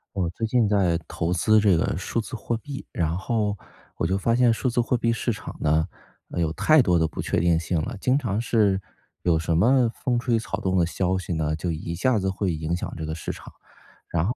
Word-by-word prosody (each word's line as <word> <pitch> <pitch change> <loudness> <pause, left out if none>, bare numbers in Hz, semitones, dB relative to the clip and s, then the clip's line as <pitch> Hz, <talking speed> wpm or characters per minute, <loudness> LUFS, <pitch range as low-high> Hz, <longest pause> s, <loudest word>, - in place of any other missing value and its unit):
我 90 -3 0
最 115 - -3
近 120 -1 +3
在 95 -5 +2
投 85 +1 -2
资 110 +5 +4
这 100 -5 +4
个 80 - 0
数 95 +6 -2
字 115 - -5
货 115 +1 -2
币， 140 +4 -7
然 80 -1 -1
后 105 +1 -1 0.4
我 80 - 0
就 95 +2 +1
发 115 +4 +1
现 120 0 +4
数 115 +3 -1
字 120 0 +2
货 120 +1 0
币 115 0 +1
市 115 +1 -1
场 110 - -7
呢， 80 +1 +2 0.4
呃， - - -4
有 80 -2 +1
太 155 - +5
多 90 -7 +3
的 80 -1 +2
不 75 - -5
确 - - 0
定 85 -1 +3
性 85 0 -1
了， 120 +10 -3
经 130 +1 +3
常 115 -6 -1
是 105 -5 +2 0.4
有 85 -2 +2
什 80 +1 0
么 120 +8 +4
风 125 -3 -1
吹 120 -1 +1
草 110 -2 -4
动 95 -2 0
的 85 - +4
消 90 +2 0
息 95 - -5
呢， 80 -1 0
就 85 +2 -3
一 80 +1 -4
下 120 +7 +2
子 95 -1 -1
会 95 -1 -1
影 80 +2 -2
响 90 - -4
这 80 - -4
个 80 - -3
市 80 - -4
场， - - -11 0.5
然 85 -1 0
后 120 +6 -1
95 Hz, 260 characters per minute, -25 LUFS, 85-115 Hz, 0.5 s, 太